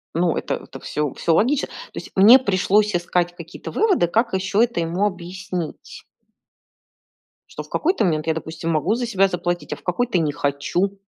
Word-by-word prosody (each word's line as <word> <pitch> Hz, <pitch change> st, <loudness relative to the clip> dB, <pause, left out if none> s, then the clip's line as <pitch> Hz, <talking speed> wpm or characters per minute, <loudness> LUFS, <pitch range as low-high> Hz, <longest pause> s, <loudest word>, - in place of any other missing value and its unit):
Ну, 170 Hz, 0 st, +2 dB
это -, -, -2 dB
это -, -, -10 dB
всё 150 Hz, -2 st, -3 dB
всё 165 Hz, -, 0 dB
логично. 260 Hz, -, +2 dB
То -, -, -19 dB, 0.2 s
есть -, -, -7 dB
мне 220 Hz, +7 st, +8 dB
пришлось 205 Hz, -2 st, +2 dB
искать 175 Hz, 0 st, 0 dB
какие-то 170 Hz, +1 st, -9 dB
выводы, 390 Hz, -, +2 dB
как 225 Hz, +6 st, 0 dB
ещё 195 Hz, +3 st, +1 dB
это 235 Hz, -5 st, -1 dB
ему 170 Hz, +4 st, 0 dB
объяснить. 180 Hz, -3 st, -5 dB, 1.5 s
Что -, -, -7 dB
в -, -, -18 dB
какой-то 360 Hz, -, +1 dB
момент 155 Hz, -3 st, 0 dB
я, 160 Hz, -, +2 dB
допустим, 160 Hz, +1 st, -4 dB
могу 165 Hz, +7 st, +1 dB
за 245 Hz, +1 st, -2 dB
себя 195 Hz, -4 st, +2 dB
заплатить, 175 Hz, -1 st, -3 dB
а -, -, -4 dB
в 145 Hz, -, -19 dB
какой-то 230 Hz, +3 st, 0 dB
не 155 Hz, -3 st, +1 dB
хочу. 145 Hz, +8 st, -1 dB
180 Hz, 180 wpm, -22 LUFS, 165-210 Hz, 1.5 s, мне